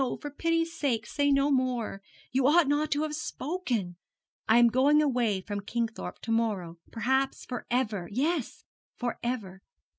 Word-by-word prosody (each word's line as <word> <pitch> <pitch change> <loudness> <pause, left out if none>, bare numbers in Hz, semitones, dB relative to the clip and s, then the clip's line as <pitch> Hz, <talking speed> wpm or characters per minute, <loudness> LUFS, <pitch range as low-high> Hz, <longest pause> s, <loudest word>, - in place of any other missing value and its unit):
For 290 - -6
pity's 330 +2 0
sake, 245 -8 0
say 285 0 0
no 275 +1 +3
more. 250 -6 0 0.3
You 260 +1 +3
ought 320 +1 +5
not 295 +2 +1
to 295 +1 +1
have 310 -1 -3
spoken. 260 - -3 0.5
I 225 - +6
am 240 0 +7
going 275 +5 +4
away 245 -9 +1
from 205 +1 -4
Kingthorpe 225 +2 -4
to 225 - -3
morrow, 200 -7 -1
perhaps 265 +4 0
for 250 - -6
ever. 215 -8 -1
Yes, 285 +4 -1 0.3
for 240 -1 -3
ever. 210 -6 -4
250 Hz, 155 wpm, -29 LUFS, 225-290 Hz, 0.5 s, am